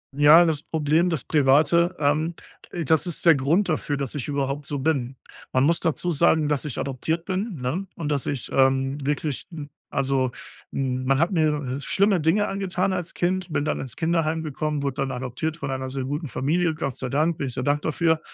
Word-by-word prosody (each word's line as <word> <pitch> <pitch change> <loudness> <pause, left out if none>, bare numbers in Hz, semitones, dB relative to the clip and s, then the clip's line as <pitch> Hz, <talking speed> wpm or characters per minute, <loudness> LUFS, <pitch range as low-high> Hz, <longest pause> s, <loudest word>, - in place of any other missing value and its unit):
Ja, 150 +4 +7
das 155 -3 0
Problem, 160 +2 +1
das 160 -6 -2
Private, 155 +5 +3
ähm, 155 +3 +1 0.5
das 160 +5 +2
ist 175 - -3
der 165 - +8
Grund 155 +9 +2
dafür, 150 -3 -1
dass 135 -3 -3
ich 140 -5 -4
überhaupt 140 0 -2
so 145 - -3
bin. 135 -3 -1 0.4
Man 130 - +2
muss 165 +4 +3
dazu 170 +2 -1
sagen, 160 -1 +3
dass 150 0 -1
ich 145 - -4
adoptiert 160 +5 -2
bin, 195 +2 -2
ne, 150 +11 -2
und 150 -3 -4
dass 145 -3 -1
ich, 135 -4 -3
ähm, 135 +1 +2
wirklich 145 -1 -2
'n 150 -4 -7 0.2
also, 135 -2 0 0.4
hm, 130 -1 -2
man 135 +1 +2
hat 165 +4 +2
mir, 150 -6 0
äh, - - -7
schlimme 200 +6 +2
Dinge 165 +7 +2
angetan 195 -1 -1
als 180 -2 -4
Kind, 180 0 -1
bin 145 - +1
dann 155 - -1
ins 130 -4 -6
Kinderheim 160 -1 0
gekommen, 150 0 -2
wurde 140 -2 -2
dann 135 0 -1
adoptiert 130 +6 -4
von 140 -4 -5
einer 130 0 -3
sehr 135 0 -3
guten 145 +4 -3
Familie. 160 +6 0
Gott 135 -5 -4
sei 130 - -4
Dank, 155 +5 +1
bin - - -2
ich 125 - -4
sehr - - -3
dankbar 145 +3 0
für. 160 -1 +2
150 Hz, 205 wpm, -24 LUFS, 135-165 Hz, 0.5 s, der